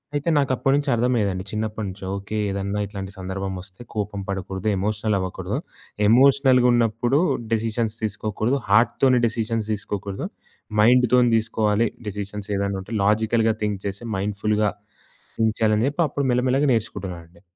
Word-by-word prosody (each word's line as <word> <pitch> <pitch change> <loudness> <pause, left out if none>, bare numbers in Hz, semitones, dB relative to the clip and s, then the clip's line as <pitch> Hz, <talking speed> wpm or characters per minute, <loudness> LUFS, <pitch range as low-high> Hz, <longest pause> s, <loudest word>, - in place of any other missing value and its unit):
అయితే 145 +3 0
నాకు 140 -2 +2
అప్పటినుంచి 140 +3 +1
అర్థం 125 +2 +1
అయ్యేదండి. 95 -3 -1
చిన్నప్పటినుంచి 105 -3 -4
ఓకే! 100 +2 -5
ఏదన్నా 100 +1 -2
ఇట్లాంటి 100 -1 -7
సందర్భం 95 +1 -4
వస్తే 95 +4 -15
కోపం 105 -1 -2
పడకూడదు, 95 +1 -4
ఎమోషనల్ 105 +2 0
అవ్వకూడదు. 95 -1 -3 0.5
ఎమోషనల్‌గున్నప్పుడు 125 -1 +4 0.3
డెసిషన్స్ 110 0 -1
తీసుకోకూడదు. 110 +4 -1
హార్ట్‌తోని 125 +4 +4
డెసిషన్స్ 115 -1 -2
తీసుకోకూడదు. 100 -1 -4 0.6
మైండ్‌తోని 125 +1 +5
దీసుకోవాలి. 110 0 +1 0.2
డెసిషన్స్ 105 0 -5
ఏదైనా 100 0 -1
ఉంటే, 105 +5 -9
లాజికల్‌గా 110 +2 +2
థింక్ 105 -2 -1
చేసి 100 +4 -4
మైండ్‌ఫుల్‌గా 105 +1 0 0.8
ఉంచాలని 110 0 +2
చెప్పి 145 +4 0
అప్పుడు 140 +1 -2
మెల్లమెల్లగా 130 +3 +2
నేర్చుకుంటున్నానండి. 90 -6 -4
110 Hz, 120 wpm, -23 LUFS, 100-120 Hz, 0.8 s, మైండ్‌తోని